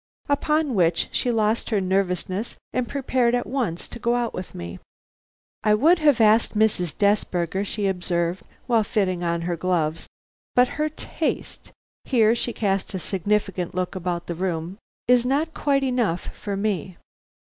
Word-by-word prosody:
Upon 300 0 +1
which 170 -4 +2
she 250 - 0
lost 220 -1 +1
her 215 - +2
nervousness 190 +2 -1 0.2
and 255 -1 -1
prepared 255 -3 +1
at 245 - -1
once 235 -11 -2
to 240 - -9
go 235 +1 +1
out 240 -1 -1
with 185 - -7
me. 85 +1 -7 0.8
"I 210 -1 +4
would 325 +10 +4
have 295 -5 +4
asked 220 0 +4
Mrs. 200 -7 +1
Desberger," 195 -3 +1
she 205 0 -3
observed 180 -1 -1 0.2
while 230 -3 +3
fitting 190 -4 0
on 170 0 0
her 175 +1 -1
gloves, 165 -2 -1 0.5
"but 250 0 +5
her 305 +1 -1
taste" 305 - -4 0.3
here 230 -4 +4
she 240 +1 -2
cast 195 -3 -1
a - - -2
significant 195 -1 -1
look 185 -1 -1
about 175 -2 -3
the 170 - -3
room 175 +1 -3 0.3
"is 245 -1 +5
not 290 +6 0
quiet 275 -2 +1
enough 240 -10 -1
for 200 -1 -4
me." 190 -4 -2
205 Hz, 155 wpm, -24 LUFS, 180-240 Hz, 0.8 s, but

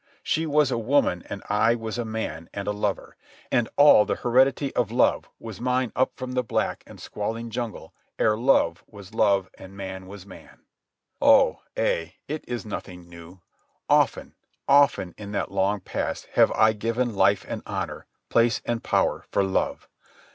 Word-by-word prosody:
She 160 -1 0
was 150 -2 +2
a 120 - 0
woman 115 -7 +1
and 100 - -6
I 110 +3 +3
was 115 0 -5
a 120 - -2
man 110 -8 -5
and 100 0 -5
a - - +1
lover, 105 -1 -3 0.4
and 120 -3 +1
all 145 -7 +8
the - - -2
heredity 130 +3 +2
of 120 -4 +1
love 120 +3 +1
was 110 -2 -9
mine 125 -1 0
up 130 - +2
from 130 -1 -6
the 125 0 0
black 115 - -2
and - - -13
squalling 115 +2 -5
jungle 120 -1 -5 0.2
ere 105 - +3
love 110 -8 +2
was 100 -1 -13
love 100 -4 +2
and 95 +1 -12
man 95 -1 -7
was 100 -1 -11
man. 95 - -15 0.6
Oh, - - +5 0.2
ay, 80 +2 -1
it 155 +1 -4
is 120 -1 -4
nothing 90 -4 -8
new. 85 +2 -13 0.5
Often, - - +2 0.3
often, 140 -10 +4
in 105 -1 -7
that - - -2
long 100 +1 0
past - - -4
have - - +5
I 110 0 +4
given 115 +3 -1
life 100 0 +2
and - - -5
honour, - - -5 0.2
place 115 -1 +3
and 120 -1 -2
power - - 0
for 100 - +1
love. 95 -1 -1
110 Hz, 170 wpm, -25 LUFS, 100-120 Hz, 0.6 s, all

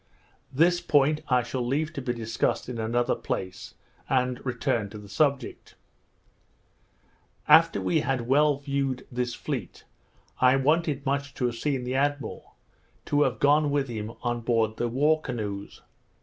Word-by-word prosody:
This 175 +6 +3
point 150 -2 +3
I 125 -1 +3
shall 125 +2 -4
leave 150 +6 -1
to 140 - -5
be 125 -1 -2
discussed 115 -1 -1
in 120 -2 -5
another 120 +2 +1
place, 95 -1 -5 0.3
and 125 0 0
return 120 -4 -1
to 105 - -9
the 105 -1 -11
subject. 135 +5 -1 1.7
After - - +6
we 95 -2 +1
had 130 -2 -1
well 145 +2 +4
viewed 140 -2 -2
this 125 -1 -2
fleet, 130 - -5 0.6
I 130 +1 +5
wanted 150 +1 +1
much 140 +1 -2
to 125 - -1
have 120 -1 -1
seen 135 +1 -1
the 125 +1 -3
admiral, 145 +1 -2 0.5
to 145 0 +1
have 130 -3 +2
gone 145 +1 +3
with 140 -2 0
him 110 -1 -5
on 120 -1 -1
board 115 -2 0
the 120 - 0
war 150 +6 +2
canoes. 105 -7 -5
130 Hz, 150 wpm, -26 LUFS, 120-145 Hz, 1.7 s, After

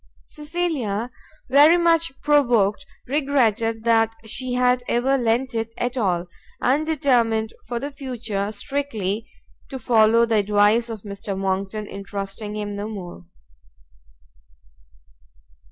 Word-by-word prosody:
Cecilia, 295 -9 -3 0.4
very 295 +5 +6
much 335 -1 +2
provoked, 245 -5 +2 0.2
regretted 240 -6 +1
that 225 -1 +3
she 250 +3 -5
had 250 0 +2
ever 255 +3 +2
lent 245 +1 0
it 225 0 -3
at 245 +1 -2
all, 180 -7 0 0.3
and 290 +5 +1
determined 235 -7 +1
for 240 -1 -3
the 285 +4 -5
future 235 -7 -4
strictly 220 -3 -3 0.4
to 270 - -5
follow 230 -1 +4
the 230 -1 +1
advice 210 +3 +3
of 220 -3 -7
Mr. 200 -1 -6
Monckton 195 +2 -2
in 200 -1 -8
trusting 200 +1 -5
him 210 -1 -4
no 205 +1 -4
more. 175 - -8
230 Hz, 120 wpm, -23 LUFS, 205-265 Hz, 0.4 s, very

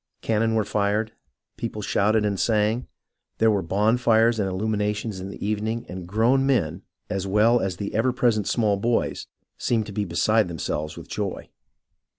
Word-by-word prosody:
Cannon 115 0 +1
were 110 -2 +1
fired, 105 +2 0 0.5
people 110 -2 -4
shouted 105 +2 +2
and 100 -2 -1
sang. 110 +2 +1 0.5
There 110 0 +4
were 100 -2 +1
bonfires 110 +4 +3
and 95 -2 0
illuminations 105 +1 -2
in 95 +1 -6
the 100 - -7
evening, 110 +3 -2
and 90 -1 -7
grown 115 +7 +3
men, 95 - +1 0.3
as 100 -2 -3
well 110 +5 +4
as 95 -3 -2
the 100 +1 -4
ever 115 +4 +2
present 115 -4 +1
small 105 -4 +2
boys, 115 +4 -1 0.3
seemed 115 -3 0
to 105 - -8
be 105 0 -1
beside 105 +4 +2
them 85 -1 -6
selves 75 +1 -3
M'ith - - -9
joy. - - -4
105 Hz, 165 wpm, -24 LUFS, 100-115 Hz, 0.5 s, There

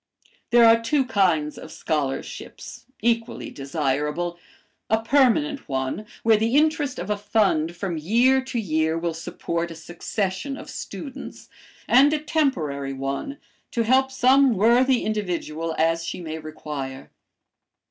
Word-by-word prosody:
"There 240 -1 +6
are 230 0 +6
two 265 +4 +1
kinds 175 -10 +1
of - - -10
scholarships, 145 -4 -4 0.2
equally 230 -1 -1
desirable; 150 +4 -2 0.5
a 220 - +3
permanent 280 +3 +2
one, 130 +10 -2 0.2
where 225 -1 +5
the 225 +4 0
interest 300 -3 +2
of 185 +4 -4
a - - +2
fund 200 -6 +1
from 175 -2 -3
year 245 +10 +3
to 255 -2 -3
year 160 -5 0
will 165 0 -2
support 170 +1 -4
a 165 - -8
succession 185 - -4
of - - -9
students, 275 -4 -8 0.4
and 275 +4 +6
a 305 - +1
temporary 160 - -1
one, 135 - -4 0.3
to 230 - 0
help 260 +3 +3
some 265 -1 +4
worthy 240 +5 +4
individual 170 -6 -2
as 165 +1 +1
she 170 - -5
may 160 -2 -5
require. 150 -4 -7
200 Hz, 135 wpm, -24 LUFS, 160-255 Hz, 0.5 s, There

